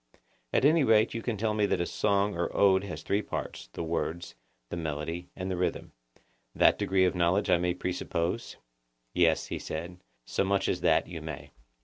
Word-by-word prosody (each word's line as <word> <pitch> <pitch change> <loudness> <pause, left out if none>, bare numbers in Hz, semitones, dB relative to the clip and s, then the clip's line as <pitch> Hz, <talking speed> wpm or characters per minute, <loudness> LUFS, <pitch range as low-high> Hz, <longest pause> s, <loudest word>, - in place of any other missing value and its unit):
At - - +2
any 155 +1 +5
rate 110 -2 +4
you 115 - -3
can 115 -2 -2
tell 110 +1 0
that 105 -1 +2
a 85 - 0
song 100 +1 +1
or 85 0 -1
ode 95 -1 +5
has 95 - -6
three 100 +1 +1
parts—the - - -6
words, 85 -2 -3 0.4
the - - -4
melody, 80 +2 -4
and 95 0 -4
the - - -1
rhythm; 90 +1 -2 0.6
that - - +4
degree 95 -1 +3
of 90 - +2
knowledge 90 +2 +2
I 90 - +5
may 90 0 0
presuppose? 90 -2 -3 0.6
Yes, 85 -3 +3
he - - -5
said; 85 +3 -6 0.3
so - - 0
much 100 0 +1
as - - -1
that - - +3
you 85 -3 -7
may. 75 -2 -7
90 Hz, 185 wpm, -29 LUFS, 85-100 Hz, 0.6 s, any